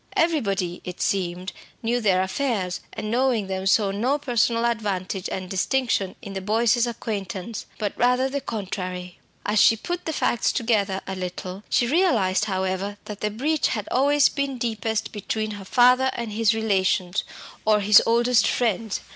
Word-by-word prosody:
Everybody, 200 - 0
it 180 0 -7
seemed, 180 -1 -1 0.3
knew 240 +2 0
their 190 -4 +3
affairs, 190 -3 -2
and 215 0 -5
knowing 245 -3 +1
them 190 0 -3
saw 200 0 +3
no 245 +8 0
personal 235 -4 +1
advantage 200 -5 -2
and 185 -1 -4
distinction 195 0 0
in 200 -3 -7
the 190 - -4
Boyces' 230 +4 +2
acquaintance, 220 -2 -5
but 205 -3 -2
rather 250 +2 +2
the 280 +1 -3
contrary. 185 -5 -5 0.3
As 210 +1 +2
she 225 - +6
put 350 +10 -5
the 320 - -1
facts 240 - +1
together 210 -6 0
a 190 - -4
little, 185 +1 -6
she 240 - +3
realised, 235 - +2
however, 190 0 -2
that 210 -1 -8
the 210 - 0
breach 285 +9 0
had 210 -4 -3
always 280 +2 +4
been 280 -2 -2
deepest 225 -2 -2
between 215 +1 -3
her 205 -2 -8
father 250 +4 +4
and 235 -2 -4
his 220 +1 +2
relations, 190 -3 +1 0.4
or 215 -1 +4
his 205 +1 +7
oldest 235 +1 +3
friends. 225 -3 0
215 Hz, 160 wpm, -24 LUFS, 190-240 Hz, 0.4 s, his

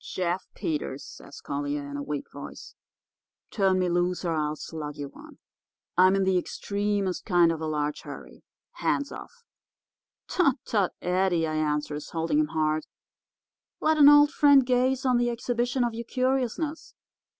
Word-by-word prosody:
"'Jeff 180 0 -2
Peters,' 145 -3 -3
says - - -12
Collier, 145 0 -3
in 140 - -7
a 140 - -3
weak 145 0 -4
voice. - - -10 0.8
'Turn 195 -3 +2
me 185 -1 +1
loose, 175 +1 0
or 170 - 0
I'll 150 -1 -1
slug 150 -2 -7
you 145 -1 -5
one. - - -14 0.6
I'm 185 +2 +5
in 195 - +2
the 190 -1 +3
extremest 200 0 -2
kind 175 -4 +4
of 160 -1 -4
a 160 - -2
large 150 -1 -2
hurry. - - -11 0.3
Hands 285 0 0
off!' 475 0 -11 0.8
"'Tut, 325 -8 +2
tut, 200 -5 0
Eddie,' 180 -2 +1
I 155 - -3
answers, 150 -1 -2
holding 165 - 0
him 305 - +2
hard; 155 - -1 0.9
'let 310 0 +2
an 290 -1 +9
old 290 0 +7
friend 285 -3 +5
gaze 255 +1 +1
on 250 -2 +3
the 240 0 +1
exhibition 240 +1 -1
of 240 -1 -1
your 235 +1 -6
curiousness. 265 +5 -2
185 Hz, 160 wpm, -27 LUFS, 155-250 Hz, 0.9 s, an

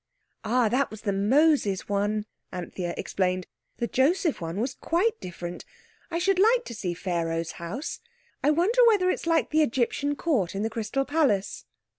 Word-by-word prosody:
"Ah, 235 +1 +2
that 255 +5 +1
was 215 -1 -10
the 200 - -1
Moses 215 - +2
one," 205 +1 0 0.3
Anthea 175 -1 -4
explained. 185 -1 -1 0.3
"The 235 - -1
Joseph 295 - +1
one 165 +3 -4
was 250 +3 -1
quite 370 - 0
different. 175 -1 -7 0.5
I 335 - -2
should 370 +2 +2
like 470 +4 +4
to - - -7
see 185 -6 -3
Pharaoh's 165 -2 -2
house. 210 - -5 0.4
I 290 - +4
wonder 365 +11 +3
whether 385 -5 +4
it's - - -4
like 330 -2 +2
the 310 +1 +4
Egyptian 285 +2 0
Court 245 - 0
in 200 - -1
the 225 - -1
Crystal 230 +5 -2
Palace." 275 -10 0
235 Hz, 165 wpm, -26 LUFS, 190-315 Hz, 0.5 s, like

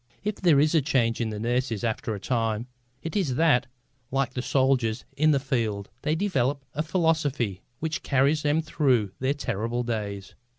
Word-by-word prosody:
If 210 0 -2
there 165 -7 +4
is 150 +2 +3
a 160 - +4
change 125 -5 +1
in 115 - 0
the 105 -1 -5
nurses 120 -1 -1
after 110 -1 -1
a - - -6
time, 115 0 -1 0.4
it 165 - -5
is 165 -11 +1
that, 150 -5 +3 0.4
like 135 -1 0
the 125 - -2
soldiers 130 -4 +1
in 155 +3 +3
the 145 -2 +4
field, 115 -7 -2
they 155 - 0
develop 140 -7 0
a 150 - -1
philosophy 155 - 0 0.2
which 160 +3 -3
carries 140 +3 +2
them 150 +2 +1
through 130 - +1
their 130 +2 0
terrible 120 -2 -2
days. 105 -4 -4
130 Hz, 175 wpm, -26 LUFS, 115-150 Hz, 0.4 s, there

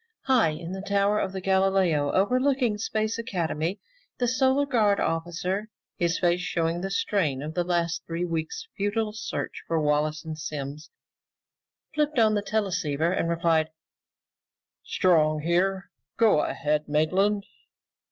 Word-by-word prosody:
High 255 -9 +4
in 165 +3 -6
the 190 0 -5
Tower 200 +1 +1
of 190 0 -2
Galileo 190 -6 +2
overlooking 250 +2 +2
Space 220 +1 -1
Academy, 175 -3 -2 0.4
the 245 - +1
Solar 265 +3 +2
Guard 215 -7 +2
officer, 175 +5 -2 0.3
his 170 -1 0
face 175 -1 +2
showing 170 -1 -1
the 195 - -3
strain 165 -9 0
of 155 +1 -5
the 175 - 0
last 170 -1 0
three 170 +1 -2
weeks' 165 - -4
futile 210 +1 -1
search 220 - -5
for 165 -1 +1
Wallace 150 +1 0
and 155 -1 -6
Simms, 150 0 -6 1.0
flipped 300 -1 0
on 220 -2 +5
the 205 - +1
teleceiver 185 -7 0
and 170 -2 0
replied, 165 -2 +2 1.1
"Strong 155 -4 +2
here. 190 +4 0 0.3
Go 220 -9 +4
ahead, 150 +1 -1
Maitland." 190 +7 +2
180 Hz, 130 wpm, -26 LUFS, 160-210 Hz, 1.1 s, on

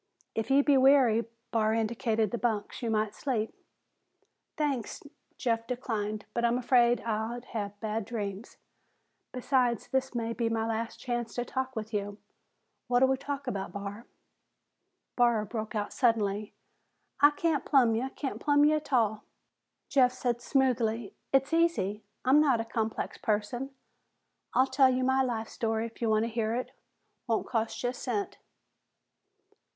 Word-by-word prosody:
"If 225 0 -2
you 275 +1 +5
be 285 -2 +4
weary," 260 -4 +5 0.3
Barr 220 -1 +2
indicated 225 -1 0
the 240 - -2
bunks, 220 -4 -2
"you 235 - -2
might 215 -1 0
sleep." 230 -6 -2 1.0
"Thanks," 280 -7 -2 0.3
Jeff 230 -2 -1
declined, 215 -4 -3
"but 235 - -1
I'm 235 +1 +3
afraid 245 -1 +3
I'd 230 +2 -3
have 205 -2 -4
bad 220 -1 -2
dreams. 205 -2 -5 0.7
Besides, 250 -2 0
this 265 -1 -1
may 230 -1 -1
be 230 -1 -1
my 225 -1 0
last 225 0 -3
chance 240 -2 -3
to 245 - -2
talk 260 +1 -3
with 220 0 -5
you. 205 0 -2 0.7
What'll 250 +1 +4
we 265 - +3
talk 285 +1 -5
about, 195 -1 -4
Barr?" 200 +3 -6 1.1
Barr 235 -3 +3
broke 220 +1 -5
out 205 -1 -2
suddenly, 210 -4 +1 0.7
"I 290 - +8
can't 300 0 0
plumb 250 -6 +4
ya. 245 +4 -1
Can't 275 - -4
plumb 290 0 +4
ya 305 +1 +4
a'tall!" 230 -8 +1 0.7
Jeff 255 -2 +4
said 245 -2 -2
smoothly, 235 -5 +1 0.2
"It's 270 +3 +2
easy. 330 - +1 0.2
I'm 275 +4 +6
not 270 -6 +3
a 225 - -2
complex 225 -1 -3
person. 220 +4 -1 0.9
I'll 260 - +5
tell 270 0 +4
you 255 0 0
my 265 +1 +3
life 230 -4 -1
story 225 0 -1
if 230 +1 -10
you 230 - +1
want 215 0 +3
to - - 0
hear 225 -1 -1
it. 250 - -3 0.6
Won't 225 -2 0
cost 225 -1 -2
you 245 - +2
a - - -4
cent." 235 -5 -3
235 Hz, 155 wpm, -29 LUFS, 220-260 Hz, 1.1 s, I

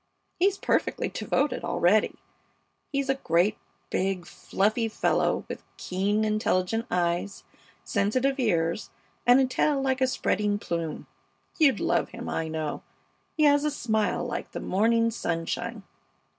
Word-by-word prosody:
He's 390 +2 +3
perfectly - - 0
devoted 280 -3 -1
already. 200 +5 +2 0.8
He's 275 -1 -1
a 270 - +3
great, 175 +5 +2 0.3
big, 190 -2 -1
fluffy 215 +6 0
fellow 220 - +1
with - - -6 0.2
keen, 205 +4 0
intelligent 215 +1 0
eyes, 175 +3 -1 0.4
sensitive 255 +7 0
ears, 170 -6 0 0.4
and 245 +2 +7
a 265 - +4
tail 280 +2 +1
like 265 -1 0
a 260 - +4
spreading 210 -5 0
plume. 170 -5 -4 0.5
You'd 285 -5 +5
love - - +1
him, - - -8
I 160 - -2
know. 155 -1 -3 0.6
He 310 - +3
has 290 -1 +5
a 300 - +2
smile 220 -7 0
like - - -5
the - - -4
morning 230 +4 +2
sunshine. 215 +3 -3
215 Hz, 130 wpm, -27 LUFS, 185-260 Hz, 0.8 s, and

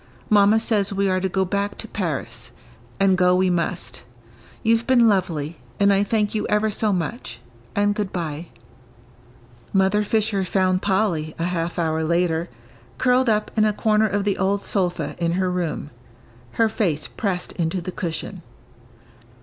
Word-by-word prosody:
Mamma 205 +1 +5
says 210 -3 +1
we 200 0 0
are 185 -1 +1
to 190 +1 -1
go 190 +1 0
back 200 +2 -2
to 225 - -8
Paris; 135 - -4 0.5
and 195 -1 +4
go 180 0 +4
we 185 0 +2
must. 170 -6 -2 0.6
You've 230 +1 +2
been 245 -3 +5
lovely, 170 -6 0 0.2
and 200 0 +5
I 195 +1 +3
thank 210 0 0
you 215 - -1
ever 210 +1 +1
so 215 +1 0
much, 180 - -3 0.4
and 205 0 +2
good 205 -2 -3
by." 165 -1 -4 1.2
Mother 195 +2 +2
Fisher 210 -2 0
found 185 0 +1
Polly, 190 -6 0
a 165 - -2
half 170 0 -2
hour 160 -2 0
later, 170 0 0 0.5
curled 250 0 +3
up 210 -1 +1
in 215 - +3
a 215 -1 +2
corner 215 0 +2
of 200 0 -1
the 200 -1 0
old 195 +1 +1
sofa 180 -3 -1
in 170 -1 0
her 185 0 0
room, 175 -5 -3 0.6
her 225 - +3
face 170 -9 -1
pressed 185 -4 -3
into 170 +1 -2
the 180 +1 -5
cushion. 165 -3 -5
190 Hz, 160 wpm, -22 LUFS, 175-210 Hz, 1.2 s, Mamma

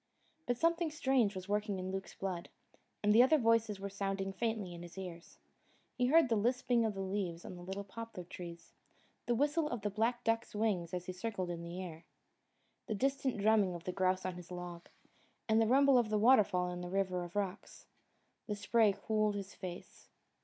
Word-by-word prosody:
But 245 -1 +1
something 335 +2 +2
strange 265 -9 +2
was 185 0 -6
working 205 -1 0
in 185 0 -4
Luke's 190 0 -5
blood, 185 -3 -4 0.5
and 210 +1 +4
other 260 +6 +7
voices 230 -4 +2
were 200 - -4
sounding 195 -1 -2
faintly 215 -4 -2
in 170 - -8
his 175 +2 -11
ears. 175 -3 -8 0.6
He 250 -1 +2
heard 320 +2 +6
the 230 - +2
lisping 240 +1 +2
of 215 -2 -1
the 195 - -3
leaves 190 -3 -3
on - - -7
the 175 - -10
little 190 +3 -5
poplar 225 -1 -8
trees, 170 -1 -9 0.5
the 240 - +2
whistle 295 +5 +2
of 240 -3 -3
the 210 - -1
black 230 +4 0
duck's 230 0 0
wings 205 -6 0
as 180 0 -4
he 185 - -5
circled 185 -2 -3
in 170 -1 -5
the 170 +2 -5
air, 165 -2 -8 0.8
the 220 - -1
distant 270 +1 0
drumming 205 -3 +3
of 170 - -8
the 185 - -2
grouse 185 0 +1
on 185 -1 -3
his 175 -1 -10
log, 175 -1 -7 0.6
the 220 0 +4
rumble 270 +1 +6
of 230 -3 0
the 215 - +2
water 230 +1 +7
fall 180 -2 -1
in 180 0 -5
the 175 - -5
River 185 -1 0
of 175 +1 -9
Rocks. 200 -1 -4 0.6
The 210 - -2
spray 205 0 +3
cooled 215 -2 +2
his 200 -1 -5
face. 180 -2 -9
200 Hz, 195 wpm, -34 LUFS, 185-230 Hz, 0.8 s, other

